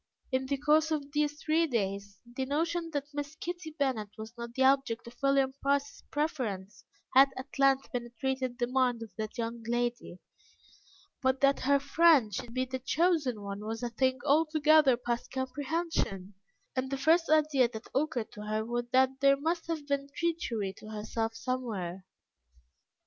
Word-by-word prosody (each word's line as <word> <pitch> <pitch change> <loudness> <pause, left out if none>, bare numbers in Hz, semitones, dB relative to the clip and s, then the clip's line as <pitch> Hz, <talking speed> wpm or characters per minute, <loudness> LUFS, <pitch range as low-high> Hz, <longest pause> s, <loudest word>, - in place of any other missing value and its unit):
In 260 0 0
the 280 +1 0
course 305 +3 +3
of 290 -3 -2
these 295 0 0
three 325 +2 +2
days, 200 -5 -2
the 250 +2 -4
notion 330 +4 -1
that 285 0 -3
Miss 290 +1 -4
Kitty 345 0 -5
Bennet 255 -7 0
was 220 +1 -8
not 235 0 -7
the 265 - +2
object 265 -4 +2
of 235 +1 -11
William 275 -1 +3
Price's 280 0 0
preference 240 - -3 0.3
had 270 +1 +8
at 265 +1 -8
length 275 0 +3
penetrated 250 +1 -3
the 245 - +1
mind 250 -2 +1
of 225 - -11
that 215 +3 -4
young 230 0 -3
lady, 240 -5 -2 1.0
but 260 0 +2
that 275 0 +4
her 280 +2 +3
friend 280 -5 +4
should 230 +5 -5
be 255 +2 -1
the 260 0 -4
chosen 285 - +1
one 200 +1 -5
was 225 +2 -4
a 240 - -2
thing 260 +2 +1
altogether 305 -2 +4
past 240 -1 -3
comprehension, 260 - -2 0.4
and 260 0 -1
the 275 - -2
first 325 +5 +3
idea 300 -5 +4
that 220 -2 -8
occurred 265 -5 -1
to 210 - -10
her 215 +1 -2
was 240 +1 -2
that 265 +1 +3
there 275 0 +5
must 330 +4 -2
have 320 -3 -3
been 280 -1 -1
treachery 240 - -1
to 215 - -11
herself 225 +1 -3
somewhere. 210 -8 -4
265 Hz, 165 wpm, -30 LUFS, 235-290 Hz, 1.0 s, had